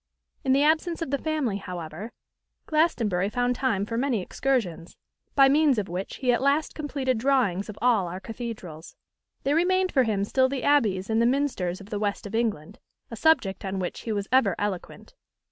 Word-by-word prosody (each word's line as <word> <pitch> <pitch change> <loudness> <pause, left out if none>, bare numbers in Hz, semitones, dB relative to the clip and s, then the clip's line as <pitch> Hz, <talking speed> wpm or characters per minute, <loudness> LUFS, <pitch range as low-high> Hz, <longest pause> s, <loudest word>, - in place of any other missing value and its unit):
In 265 - +1
the 280 +2 +4
absence 325 +2 +1
of 270 - -6
the 280 - 0
family, 300 -10 -1
however, 180 +2 -7 0.5
Glastonbury 230 - +1
found 245 +2 0
time 230 -7 0
for 230 +2 -3
many 260 -4 +1
excursions; 185 -5 -2 0.4
by 275 -1 +7
means 290 -1 +4
of 205 -2 -1
which 180 +3 -5
he 250 -2 +1
at 240 - 0
last 285 +3 +1
completed 275 -5 -2
drawings 230 -7 +1
of 210 - -8
all 225 -7 +3
our 180 +2 -5
cathedrals. 210 -8 -8 0.5
There 280 +2 +1
remained 370 +2 +2
for 270 - +4
him 215 -5 0
still 260 +5 +2
the 270 -1 -3
abbeys 210 -10 +2
and 225 0 +1
the 235 - +4
minsters 245 -10 0
of 200 +2 -13
the 205 - -2
West 205 0 -2
of 205 - -7
England, 220 -9 -2 0.3
a - - -5
subject 265 -9 +2
on 195 0 -3
which 180 -2 -3
he 225 - -5
was 205 -1 -2
ever 230 -8 +4
eloquent. 205 -3 -5
230 Hz, 190 wpm, -26 LUFS, 195-275 Hz, 0.5 s, by